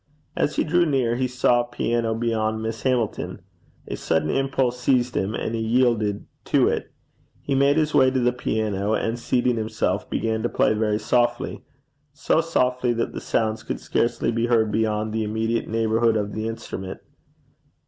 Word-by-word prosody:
As - - 0
he - - +2
drew 175 +2 +2
near 130 -5 +1
he 130 +1 0
saw 125 -1 +2
a 120 - -6
piano 120 -1 -1
behind 110 -1 -1
Miss 110 0 -4
Hamilton. 125 -5 -1 0.4
A - - -4
sudden 80 -1 0
impulse 135 -2 0
seized 125 -1 +1
him, 100 +3 -1
and 110 - -3
he 115 - -1
yielded 110 -3 +1 0.2
to - - +3
it. - - -2 0.5
He 140 - -1
made 140 +2 +3
his 155 -1 +1
way 130 -1 +5
to 130 0 0
the 125 0 +2
piano, 110 -4 -1
and 115 +2 -2
seating 125 0 +1
himself, 110 0 -1
began 110 -1 -1
to 120 - 0
play - - +2
very 105 -1 +1
softly 120 +3 0 0.5
so 155 +2 +1
softly 125 -6 +1
that 115 0 -2
the - - -5
sounds 110 -1 -1
could - - -4
scarcely 120 0 0
be 115 +1 0
heard 110 -3 +2
beyond 110 0 0
the 110 0 0
immediate 110 +2 -1
neighbourhood 115 0 +2
of 105 -1 -2
the 110 +1 -3
instrument. 95 -4 -6
115 Hz, 175 wpm, -23 LUFS, 110-125 Hz, 0.5 s, way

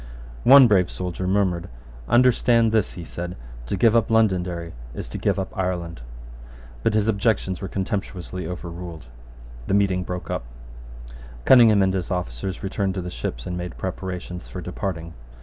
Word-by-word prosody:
One 135 0 +9
brave 95 -5 +3
soldier 90 0 -4
murmured. 95 -3 +1 0.4
"Understand 120 -2 +4
this," 110 -3 +1
he 85 - -7
said, 90 +2 -6 0.3
"to 95 - -2
give 115 +4 +4
up 115 - +3
Londonderry 90 -6 +1 0.2
is - - -5
to - - -5
give - - +1
up 95 -1 -4
Ireland." 90 -5 -3 0.8
But 105 - +1
his 110 0 +2
objections 100 -3 0
were 95 - -3
contemptuously 95 -2 -4
overruled, 85 -3 -7 0.6
The 100 - +2
meeting 95 -2 +2
broke 90 0 -5
up. - - -3 1.0
Cunningham 115 -6 +7
and 95 0 +2
his 95 -2 -2
officers 90 0 -3
returned 95 0 -1
to 95 - -2
the 90 - -5
ships, - - -5
and 90 - -3
made 90 -1 -5
preparations 90 -1 -5
for 90 - -7
departing. 90 -2 -4
95 Hz, 155 wpm, -23 LUFS, 90-100 Hz, 1.0 s, One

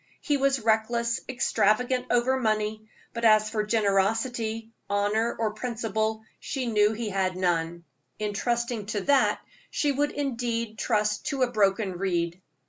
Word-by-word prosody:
He 295 - 0
was 275 -1 +2
reckless, 235 +1 +1
extravagant 250 +1 +1
over 255 +2 +2
money, 215 -1 -1 0.3
but 230 - -5
as 215 -1 +5
for 215 -2 0
generosity, 225 +2 0 0.2
honor, 205 +3 +1
or 220 -2 -1
principle, 220 -2 -2 0.2
she 265 -3 -3
knew 210 -2 +3
he 225 0 -3
had 190 -2 0
none. 170 -2 0 0.3
In 210 -1 -2
trusting 235 -1 -1
to 210 -1 -2
that 280 +2 +3 0.3
she 290 - +1
would 290 +2 +1
indeed 235 -5 -3
trust 210 -2 0
to 275 -3 0
a 245 - 0
broken 195 -4 +1
reed. 175 -2 -1
220 Hz, 140 wpm, -27 LUFS, 210-240 Hz, 0.3 s, as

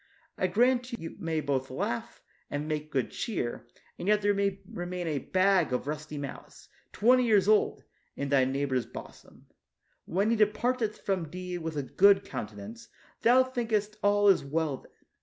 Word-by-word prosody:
I 185 - 0
grant 245 +4 +2
you 165 -8 -6
may 160 -2 -1
both 135 -2 -1
laugh 120 -2 -4 0.3
and 145 +1 -3
make 155 0 -3
good 130 -3 -1
cheer, 180 - -3 0.3
and 180 - -5
yet 210 0 +3
there 205 0 +3
may 200 -1 0
remain 175 0 -5
a 150 -4 -1
bag 185 0 +2
of 125 - -1
rusty 150 +1 -5
malice, 140 -1 -8 0.2
twenty 250 +4 +4
years 210 -5 +3
old, 215 0 +3 0.3
in 140 - -3
thy 140 -2 +4
neighbor's 130 -2 -1
bosom. - - -12 0.6
When 200 +6 +1
he - - +3
departeth 220 +1 +1
from 185 -5 -1
thee 180 +1 -5
with 160 -2 -5
a 145 - -1
good 195 +9 +4
countenance, 105 +2 -7 0.3
thou 250 +3 +6
thinkest 225 -5 -1
all 205 0 +3
is 195 -6 +5
well 150 0 -1
then. - - -19
180 Hz, 165 wpm, -29 LUFS, 145-210 Hz, 0.6 s, thou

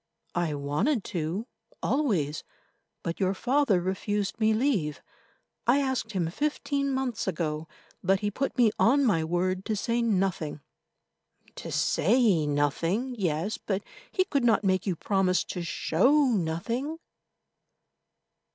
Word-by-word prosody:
"I 170 -4 0
wanted 180 - 0
to, 170 +5 -2 0.4
always, 190 - 0 0.6
but 165 - -3
your 190 0 +1
father 250 -3 +2
refused 195 +3 -2
me 220 0 +4
leave. 215 - 0 0.6
I 245 +3 +5
asked 260 -5 -1
him 170 -4 -1
fifteen 280 - -1
months 260 -6 -2
ago, 160 -4 -2 0.4
but 190 +1 +2
he 205 0 0
put 270 +5 -2
me 235 -4 +5
on 275 +4 +4
my 175 -9 +2
word 180 +3 0
to 220 - -1
say 230 +4 0
nothing." 190 -9 0 0.9
"To - - -7
say 200 - +3
nothing—yes, 170 - 0
but 195 -1 -2 0.3
he 370 - +1
could 280 -7 0
not 225 -3 +3
make 190 0 +1
you 185 - +1
promise 185 +1 +1
to 180 - -5
show 225 - +3
nothing." 230 - -1
195 Hz, 125 wpm, -28 LUFS, 170-245 Hz, 0.9 s, I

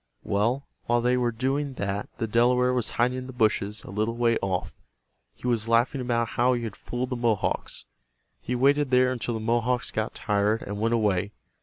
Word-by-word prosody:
Well, 115 +7 0 0.2
while 120 0 +2
they 125 +1 +2
were 125 -1 +1
doing 135 +4 -1
that 100 -1 -3
the 115 - -1
Delaware 125 +3 +3
was 125 -3 0
hiding 125 +2 +2
in 130 - -7
the 130 - -8
bushes 110 -3 0
a - - -9
little 110 +3 -1
way 120 -1 +3
off. 95 -2 -2 0.6
He - - -13
was 115 -2 0
laughing 120 +4 +2
about 120 -2 0
how 125 +2 +2
he 120 -1 -2
had 110 -3 -5
fooled 125 +2 -4
the - - 0
Mohawks. 115 -4 -1 0.6
He 125 - -2
waited 140 +3 +3
there 125 0 +4
until 120 -2 -3
the - - -3
Mohawks 120 +2 0
got 110 0 -2
tired 105 +1 0
and 100 0 -5
went 115 +2 +2
away. 100 -2 0
120 Hz, 195 wpm, -26 LUFS, 110-125 Hz, 0.6 s, there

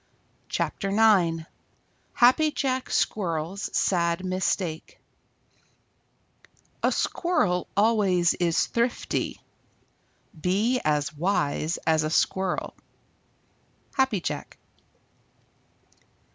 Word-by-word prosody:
CHAPTER 195 - -2
IX 195 -6 +3 0.7
HAPPY 260 +5 +5
JACK 260 -1 -1
SQUIRREL'S 175 -1 -1
SAD 170 0 +1
MISTAKE 185 -3 -2 1.8
A - - +2
Squirrel 180 - 0
always 200 -5 +3
is 170 -2 +1
thrifty. 235 +1 -2 1.0
Be 215 +9 +1
as 150 +1 0
wise 160 -2 0
as 160 -1 +3
a 155 - -1
Squirrel. 190 +3 0 1.2
_Happy 260 -9 +1
Jack. 145 - -5
185 Hz, 75 wpm, -26 LUFS, 165-220 Hz, 1.8 s, HAPPY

